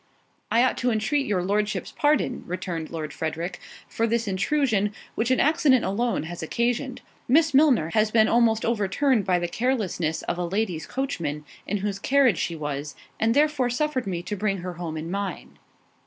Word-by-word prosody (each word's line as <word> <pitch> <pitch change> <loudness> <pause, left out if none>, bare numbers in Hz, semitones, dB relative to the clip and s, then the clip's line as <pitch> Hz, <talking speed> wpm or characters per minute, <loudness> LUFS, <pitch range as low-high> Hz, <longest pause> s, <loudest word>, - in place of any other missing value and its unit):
"I 235 +2 +4
ought 255 - +1
to 250 - +1
entreat 245 +6 0
your 190 -4 0
Lordship's 210 +3 -1
pardon," 295 -4 +1
returned 175 -2 -4
Lord 155 -2 -5
Frederick, 165 +3 -4 0.3
"for 230 - -1
this 230 0 0
intrusion, 210 0 +1 0.2
which 225 +2 -1
an 255 - +3
accident 295 -5 +4
alone 225 +1 0
has 170 +2 -7
occasioned. 240 - -1 0.3
Miss 305 +4 +4
Milner 265 - +4
has 215 0 +3
been 220 0 +4
almost 225 -2 +3
overturned 230 +2 +1
by 185 -2 +3
the 175 0 -1
carelessness 185 -8 -1
of 175 - -3
a - - 0
lady's 180 -3 -2
coachman, 165 - -3 0.2
in 205 - 0
whose 200 -1 -2
carriage 260 -5 +3
she 170 - -2
was, 145 -1 -4 0.2
and 225 +2 +2
therefore 295 -4 +2
suffered 260 -1 -1
me 175 -2 -3
to 210 - -4
bring 205 -1 -1
her 180 - -4
home 170 -2 -5
in 160 +2 -5
mine." 200 -3 -5
215 Hz, 175 wpm, -25 LUFS, 175-250 Hz, 0.3 s, I